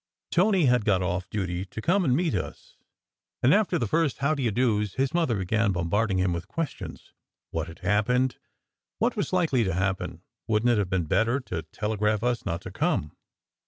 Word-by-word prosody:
Tony 185 -2 +3
had 125 -3 +3
got 95 -3 +2
off 90 +1 -2
duty 90 -3 -2
to 95 +3 -8
come 180 - +2
and 130 -6 +3
meet 165 0 +1
us; - - -5 0.7
and 130 - +6
after 200 -3 +3
the 120 - 0
first 155 +4 +1
"how 140 +3 +1
do 140 - -3
you 120 - +2
dos," 105 -3 +1
his 135 0 0
mother 160 -10 +1
began 100 +3 +1
bombarding 95 +4 0
him 90 -1 +1
with 85 +1 -5
questions. 160 +7 -5 0.4
What 80 -1 -2
had 80 0 -10
happened? 120 +7 +1 0.6
What - - +1
was - - -2
likely 160 -10 +2
to 95 -5 -1
happen? 95 +1 -2 0.2
Wouldn 110 +1 +1
t 120 - +5
it 110 - +2
have 100 -3 -1
been 95 -3 0
better 115 - +2
to 90 -9 -4
tele 105 0 -2
graph 105 +1 +1
us 120 -3 0
not 85 -2 -2
to - - -8
come? 75 - 0
110 Hz, 200 wpm, -26 LUFS, 95-130 Hz, 0.7 s, and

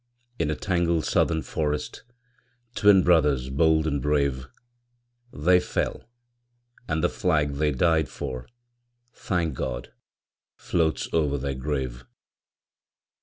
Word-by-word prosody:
In 75 - 0
a 75 - 0
tangled 85 -3 0
Southern 80 -1 +1
forest, 75 -1 -3 0.7
Twin 100 -4 +5
brothers 75 -7 +2
bold 80 +2 +3
and 70 -3 -1
brave, 70 -2 0 0.8
They 90 +5 +3
fell; 90 - -3 0.8
and 80 -2 -1
the - - +5
flag 75 -5 0
they 75 +1 +2
died 80 +1 +2
for, 65 -3 -6 0.7
Thank 85 -5 -2
God! - - -5 0.6
floats 80 -3 0
over 75 -3 +1
their 70 0 -3
grave. 65 -2 -4
75 Hz, 110 wpm, -25 LUFS, 70-80 Hz, 0.8 s, Twin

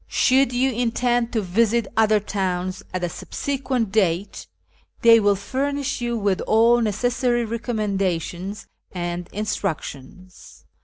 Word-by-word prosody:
Should 265 0 +3
you 255 +2 +1
intend 240 0 0
to 220 -3 0
visit 225 +5 +2
other 215 -1 +4
towns 185 -2 -3
at 185 -1 -3
a - - +1
subsequent 255 - -3
date, 185 - 0 0.6
they 230 -1 +8
will 205 -1 +3
furnish 280 +6 -2
you 240 -1 -1
with 200 -3 0
all 235 +2 +4
necessary 240 +2 0
recommendations 200 -5 -2 0.3
and 175 -1 -4
instructions. 185 -5 -6
215 Hz, 115 wpm, -22 LUFS, 185-240 Hz, 0.6 s, they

